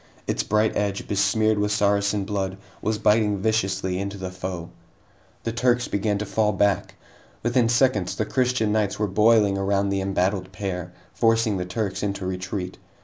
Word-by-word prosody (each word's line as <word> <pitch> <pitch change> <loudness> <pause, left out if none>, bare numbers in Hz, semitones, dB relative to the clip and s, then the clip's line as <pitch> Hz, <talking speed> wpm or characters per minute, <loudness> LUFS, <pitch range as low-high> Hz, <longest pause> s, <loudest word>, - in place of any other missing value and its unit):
Its - - 0
bright 110 +1 +1
edge, 100 -1 -1
besmeared 110 +1 +2
with 105 0 0
Saracen 100 -1 +1
blood, 95 -2 -2 0.2
was 110 0 0
biting 105 -1 +3
viciously 95 -3 0
into 100 +1 -4
the 95 -1 -5
foe. 90 -2 -6 0.7
The 115 - -2
Turks 120 +1 +1
began 100 0 0
to 105 - -3
fall 105 +1 +1
back. 100 0 +1 0.5
Within 120 0 +2
seconds, 120 -6 +2
the 110 - -1
Christian 125 -2 +1
knights 105 -2 0
were 105 - +1
boiling 105 0 +3
around 100 0 +1
the 100 0 0
embattled 95 0 -1
pair, 90 -2 -4 0.2
forcing 115 -2 +2
the 90 - -3
Turks 95 +2 -3
into 100 -2 -2
retreat. 90 0 -4
100 Hz, 160 wpm, -24 LUFS, 95-110 Hz, 0.7 s, biting